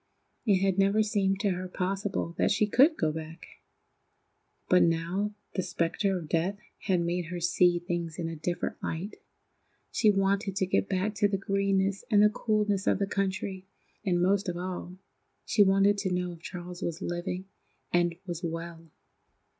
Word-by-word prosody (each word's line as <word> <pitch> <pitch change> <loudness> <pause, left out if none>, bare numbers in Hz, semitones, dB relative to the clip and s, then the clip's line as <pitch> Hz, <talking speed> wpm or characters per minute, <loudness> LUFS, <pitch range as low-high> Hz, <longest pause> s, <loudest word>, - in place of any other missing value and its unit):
It 195 -3 +4
had 195 -1 +2
never 200 +2 +4
seemed 195 -2 +1
to 200 - +2
her 185 0 -3
possible 190 -1 -2
that - - +3
she 210 +1 +3
could 275 +10 +4
go 155 -2 +1
back. 160 +1 -7 1.2
But 180 - +5
now 170 +5 0 0.2
the 185 - 0
spectre 185 +2 0
of 165 -3 -7
death 170 +6 0 0.2
had 185 -3 +1
made 170 +1 -1
her 175 +2 -5
see 175 +1 +3
things 170 -2 -3
in 170 -2 -2
a 165 - -4
different 175 +3 -3
light. 175 +6 -4 0.7
She 215 - +3
wanted 195 0 +1
to 195 - +1
get 190 +1 0
back 195 +2 0
to 205 0 +2
the 200 -1 -1
greenness 195 0 0
and 210 -2 +5
the 210 - +7
coolness 210 -3 0
of - - +4
the 200 - 0
country, 190 -1 -2 0.4
and, 180 -4 +1
most 190 +2 +2
of 175 - -3
all, 180 0 -5 0.5
she 210 - +2
wanted 195 +1 +4
to 195 -2 -1
know 180 0 -1
if 170 -1 -11
Charles 175 0 -7
was 170 +2 -3
living 175 +2 -3 0.5
and 175 -1 +2
was 175 -2 -5
well. 165 0 -5
185 Hz, 170 wpm, -29 LUFS, 175-200 Hz, 1.2 s, the